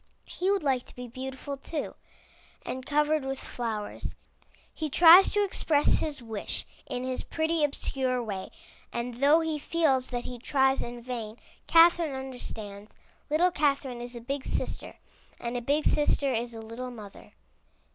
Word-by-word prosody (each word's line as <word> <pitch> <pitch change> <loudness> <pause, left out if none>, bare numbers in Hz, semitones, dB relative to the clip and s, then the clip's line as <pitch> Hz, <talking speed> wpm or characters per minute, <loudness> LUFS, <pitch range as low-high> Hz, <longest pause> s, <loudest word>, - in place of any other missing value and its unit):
He 370 - -2
would 400 -4 +2
like 265 -3 +1
to - - -11
be 250 0 -7
beautiful 265 +3 -6
too, 295 +2 -4 0.7
and 260 0 -4
covered 300 0 +2
with 270 0 -3
flowers. 220 -4 -4 0.6
He 310 -1 -3
tries 345 +6 +9
to 415 0 +2
express 315 -6 +2
his 290 -5 -3
wish 220 -3 -3 0.2
in 250 - -3
his 255 0 -2
pretty 320 0 0
obscure 260 -3 0
way, 195 -4 -5 0.4
and 240 +1 -3
though 285 +6 +4
he 320 -2 -2
feels 285 -5 +2
that 245 -1 -4
he 245 -1 -7
tries 265 +1 +2
in 240 0 -7
vain, 230 -3 -5 0.3
Catherine 330 -3 +5
understands. 220 -6 -7 0.3
Little 340 +5 +3
Catherine 275 -6 0
is 245 0 -6
a 235 - -7
big 275 +3 -3
sister, - - -2 0.4
and 235 +1 -4
a 245 - -1
big 285 +5 +1
sister 285 -2 +2
is 235 0 -2
a 225 - -7
little 230 +3 -6
mother. 215 -5 -11
265 Hz, 155 wpm, -28 LUFS, 240-300 Hz, 0.7 s, tries